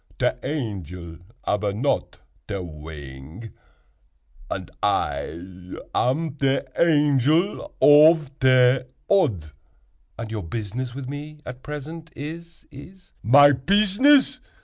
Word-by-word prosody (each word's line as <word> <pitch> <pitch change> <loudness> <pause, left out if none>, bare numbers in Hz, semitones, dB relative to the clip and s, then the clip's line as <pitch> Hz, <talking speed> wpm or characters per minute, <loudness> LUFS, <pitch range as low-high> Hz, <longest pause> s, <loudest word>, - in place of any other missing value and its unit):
Te - - +2
angel 90 - -5 0.3
ab 105 - 0
not 130 +7 -2 0.3
te 100 - -4
wing, 75 +3 -10 1.0
and - - -5
I 90 +2 -3 0.2
am 150 +3 0
te 135 -1 +1
Angel 155 - +2
ov 150 0 +6
te 130 0 +5 0.3
Odd." 110 - +1 0.7
"And 115 -1 -6
your 110 -2 -3
business 115 +7 -5
with 135 -2 -6
me 150 +2 -8
at 125 0 -8
present 155 +3 -8
is—is—" 170 +3 -11
"My 145 +6 +7
pizzness!" 210 - +3
135 Hz, 100 wpm, -23 LUFS, 100-155 Hz, 1.0 s, My